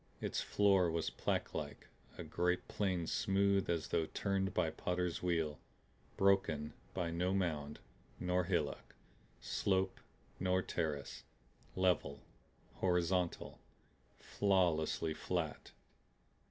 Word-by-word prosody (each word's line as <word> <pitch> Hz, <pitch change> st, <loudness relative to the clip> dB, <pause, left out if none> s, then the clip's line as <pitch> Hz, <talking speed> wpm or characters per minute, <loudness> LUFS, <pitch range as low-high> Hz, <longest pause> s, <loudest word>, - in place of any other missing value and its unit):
Its -, -, -1 dB
floor 100 Hz, -4 st, +4 dB
was 80 Hz, 0 st, -1 dB
plaquelike, 70 Hz, -1 st, -3 dB, 0.3 s
a -, -, -5 dB
great 90 Hz, +3 st, 0 dB
plane 95 Hz, -5 st, 0 dB
smooth 100 Hz, +2 st, +2 dB
as 85 Hz, -2 st, 0 dB
though 80 Hz, -, +1 dB
turned 95 Hz, +2 st, 0 dB
by -, -, +1 dB
potter's 90 Hz, -1 st, -2 dB
wheel, 80 Hz, -5 st, 0 dB, 0.6 s
broken 95 Hz, -6 st, +2 dB, 0.2 s
by 90 Hz, -3 st, -1 dB
no 90 Hz, +3 st, 0 dB
mound 75 Hz, -6 st, -1 dB, 0.4 s
nor 90 Hz, 0 st, +1 dB
hillock, 85 Hz, -5 st, -2 dB, 0.4 s
slope 95 Hz, -1 st, 0 dB, 0.4 s
nor 95 Hz, 0 st, +2 dB
terrace; 75 Hz, -7 st, -3 dB, 0.5 s
level, 90 Hz, -7 st, +1 dB, 0.5 s
horizontal, 90 Hz, +2 st, 0 dB, 0.6 s
flawlessly 85 Hz, -5 st, +1 dB
flat. 80 Hz, -1 st, -3 dB
90 Hz, 100 wpm, -36 LUFS, 80-95 Hz, 0.6 s, floor